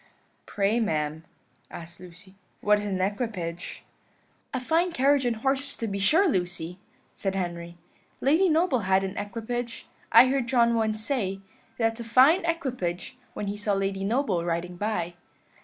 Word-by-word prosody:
"Pray, 205 +3 +1
ma'am," 155 -6 -1 0.4
asked 170 0 -10
Lucy, 180 +2 -13 0.3
"what 210 0 +4
is 205 - -4
an 195 -2 -2
equipage?" 185 -4 -3 0.7
"A 260 - -2
fine 330 +7 +1
carriage 275 -3 +3
and 235 - 0
horses, 270 +4 -1
to 230 - -3
be 200 -2 -3
sure, 320 - +4
Lucy," 180 - -2 0.3
said 195 -1 -3
Henry. 170 -2 -4 0.4
"Lady 320 +8 +3
Noble 320 -4 +2
had 190 -1 +2
an 190 +1 -4
equipage. 230 +3 -4 0.3
I - - +9
heard 265 -2 0
John 235 -2 +3
once 220 -1 0
say, 195 -9 -2 0.4
'That's 225 0 0
a - - -4
fine 260 - +5
equipage,' 255 - -3 0.2
when 210 - -3
he 200 +1 -3
saw 205 0 -1
Lady 195 0 -1
Noble 210 -5 0
riding 170 +1 -2
by." 175 -3 -2
210 Hz, 155 wpm, -26 LUFS, 185-255 Hz, 0.7 s, I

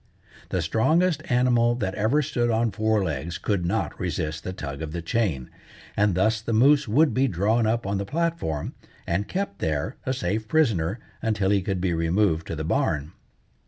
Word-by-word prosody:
The 90 -2 -1
strongest 155 - +2
animal 120 -1 +3
that 95 -6 -2
ever 115 +9 +1
stood 125 -4 0
on 115 0 +1
four 110 0 +1
legs 80 0 -3
could 95 -5 -1
not 110 +5 -2
resist 80 -3 -3
the 95 - -4
tug 70 -5 -6
of 80 -1 -5
the 85 - -3
chain, 85 - -1 0.4
and 105 -3 +2
thus 110 +3 +2
the 115 0 -3
moose 140 +5 +4
would 145 +9 +3
be 135 +1 +2
drawn 110 +3 +1
up 115 0 0
on 100 0 -1
the - - -1
platform, 165 - -2 0.3
and 95 +4 -1
kept 190 - -3
there, 80 - -2
a 130 - -1
safe 110 -2 -2
prisoner, 110 - +1 0.2
until 105 -4 +1
he 100 -1 +3
could 95 0 -2
be 90 -2 +1
removed 85 0 +1
to - - -4
the 80 - -4
barn. 75 -1 0
105 Hz, 185 wpm, -25 LUFS, 85-120 Hz, 0.4 s, moose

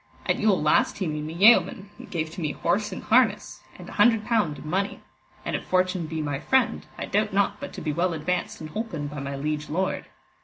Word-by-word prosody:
At - - +1
Yule 210 -3 +3
last 150 0 +2
he 195 - -2
made 150 -2 -3
me 160 +2 -6
yeoman, 205 +1 +4
and - - -11
gave 160 -3 -3
to 175 - -7
me 155 - -1
horse 205 +5 0
and 185 - -6
harness, 225 -3 +2 0.2
and - - -11
an - - -9
hundred 220 0 +4
pound 210 -11 +1
in 150 - -10
money; 195 +5 -1 0.5
and - - -1
if - - -3
fortune 185 -2 0
be 160 -1 -3
my 145 -2 -2
friend, 260 - +1
I - - -3
doubt 210 0 0
not 200 0 +1
but 280 - -6
to - - -7
be 150 - -2
well 175 +3 +1
advanced 165 +3 -2
and 155 -1 -7
holpen 195 -7 -4
by 145 0 -6
my 140 0 -4
liege 150 +1 -3
lord. 185 +5 -2
180 Hz, 230 wpm, -25 LUFS, 155-210 Hz, 0.5 s, yeoman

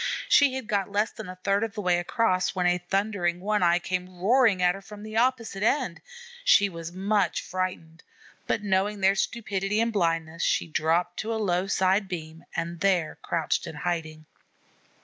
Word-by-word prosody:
She 280 -3 +5
had 260 -3 -4
got 200 -1 -1
less 210 +2 +1
than 215 -4 -9
a 185 - -7
third 200 +1 +2
of 225 -1 -4
the 210 - -3
way 180 -2 +2
across 185 0 0
when 180 -1 0
a 180 0 +3
thundering 180 -1 -1
One 210 +2 0
eye 175 0 +4
came 180 0 -4
roaring 225 0 +4
at 180 0 +3
her 195 - -9
from 210 +1 -11
the 215 0 -8
opposite 230 -4 0
end. 230 - 0 0.4
She 200 - +5
was 165 -2 -7
much 195 -1 0
frightened, 180 -3 -4 0.5
but 210 - 0
knowing 200 +1 0
their 190 +1 +5
stupidity 200 -1 -1
and 230 0 +1
blindness, 165 -3 0
she - - +1
dropped 165 +2 0
to 220 - -3
a - - -1
low 185 -3 0
side 190 +1 +2
beam 165 -3 -7
and 170 0 -3
there 180 -5 +1
crouched 165 -2 -1
in - - -7
hiding. 155 -1 -3
190 Hz, 185 wpm, -26 LUFS, 175-210 Hz, 0.5 s, She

